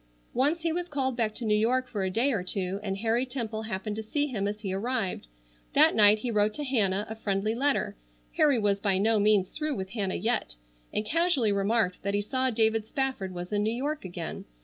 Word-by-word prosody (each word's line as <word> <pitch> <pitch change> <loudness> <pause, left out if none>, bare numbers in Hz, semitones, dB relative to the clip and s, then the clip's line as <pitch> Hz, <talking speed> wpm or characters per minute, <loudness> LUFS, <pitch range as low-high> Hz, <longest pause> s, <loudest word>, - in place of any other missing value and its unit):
Once 290 +7 +1
he 330 0 0
was 350 +1 -3
called 265 -3 -1
back 220 -3 -1
to 240 - -3
New 215 - +2
York 250 +4 +1
for 210 -5 -4
a 190 - 0
day 235 +9 +1
or 205 - 0
two, 185 +1 -2
and 195 -2 -3
Harry 230 +4 +1
Temple 235 -4 -4
happened 210 -1 -4
to 220 - -4
see 290 +7 -1
him 215 -8 -2
as 210 +1 -4
he 195 -3 -3
arrived. 195 - -2 0.5
That - - +6
night 210 0 +7
he 235 +3 -3
wrote 210 0 +2
to 295 - -4
Hannah 210 -7 +1
a 220 - -5
friendly 210 -1 -1
letter—Harry 230 - 0
was 205 -2 +1
by 195 -2 +2
no 215 +2 +3
means 205 -2 +3
through 305 -2 -2
with 190 -1 -5
Hannah 200 -5 -2
yet—and - - -3
casually 310 -6 +2
remarked 200 -1 +1
that 200 +1 -1
he 205 - +1
saw 260 +5 0
David 220 -1 +2
Spafford 265 -9 -1
was 180 +1 -6
in 205 - +1
New 215 +1 +1
York 290 +5 -3
again. 175 -3 -6
215 Hz, 215 wpm, -28 LUFS, 195-255 Hz, 0.5 s, night